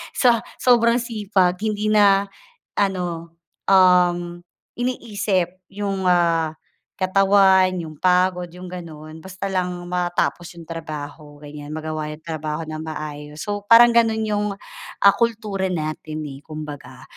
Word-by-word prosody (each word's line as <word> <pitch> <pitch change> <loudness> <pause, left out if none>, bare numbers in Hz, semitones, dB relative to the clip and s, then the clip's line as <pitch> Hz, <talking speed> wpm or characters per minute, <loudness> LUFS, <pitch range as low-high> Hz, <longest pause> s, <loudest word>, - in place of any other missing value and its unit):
Sa 240 -3 +3 0.2
sobrang 235 -1 +4
sipag 205 -6 0
hindi 215 -1 -1
na, 200 -2 +4 0.5
ano, 175 -4 -2 0.3
um, 175 -2 +3 0.4
iniisip 205 -7 -1 0.2
'yung, 195 -2 -2
ah, 170 -3 +2 0.5
katawan, 190 -1 +4
'yung 155 -2 -10
pagod, 180 0 +2
'yung 180 +1 -11
gano'n. 160 -3 -9
Basta 190 +3 -6
lang 180 -1 -1 0.2
matapos 175 0 -1
'yung 170 - -11
trabaho 155 -2 -8
ganiyan, 150 0 -8
magawa 155 -1 -4
'yung 150 +1 -8
trabaho 155 -1 -4
nang 155 0 -6
maayos. 150 -1 -7
So 205 0 -4
parang 235 +2 +8
gano'n 225 -2 +2
'yung 210 -1 -1 0.5
ah, 200 0 +7
kultura 215 -4 -1
natin, 155 -3 -4
eh, 135 - -9
kumbaga. 155 -2 -9
180 Hz, 120 wpm, -22 LUFS, 160-200 Hz, 0.5 s, parang